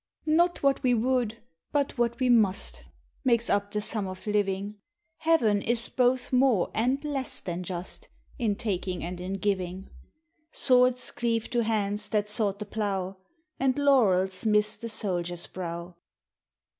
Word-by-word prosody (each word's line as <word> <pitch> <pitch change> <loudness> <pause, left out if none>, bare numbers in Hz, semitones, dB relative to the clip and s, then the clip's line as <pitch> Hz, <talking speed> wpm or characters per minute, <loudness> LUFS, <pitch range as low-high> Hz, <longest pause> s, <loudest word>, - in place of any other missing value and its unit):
Not 340 +2 +2
what 275 -1 +3
we 250 -1 +3
would, 230 -1 0 0.3
but 285 -2 0
what 235 -1 0
we 255 - +2
must, 220 -6 +2 0.4
Makes 235 -3 +2
up 200 0 +1
the 210 0 -2
sum 210 -2 -2
of 185 0 -8
living; 205 0 -1 0.4
Heaven 230 -11 +2
is 235 +1 +2
both 250 0 +1
more 250 -7 +3
and 255 +6 0
less 280 -3 0
than 175 0 -4
just 180 - -6 0.3
In 220 -4 +1
taking 190 -4 -3
and 175 +1 -5
in 185 +2 -4
giving. 190 -2 -2 0.6
Swords 250 -1 +3
cleave 230 -2 -1
to 240 - +2
hands 210 -1 -1
that 210 -1 0
sought 210 -2 0
the 210 - -6
plough, 195 -3 -3 0.4
And 265 0 +1
laurels 200 -10 +3
miss 210 -1 +2
the 230 - -7
soldiers 175 -5 -2
brow. 170 -1 -6
215 Hz, 145 wpm, -27 LUFS, 190-250 Hz, 0.6 s, what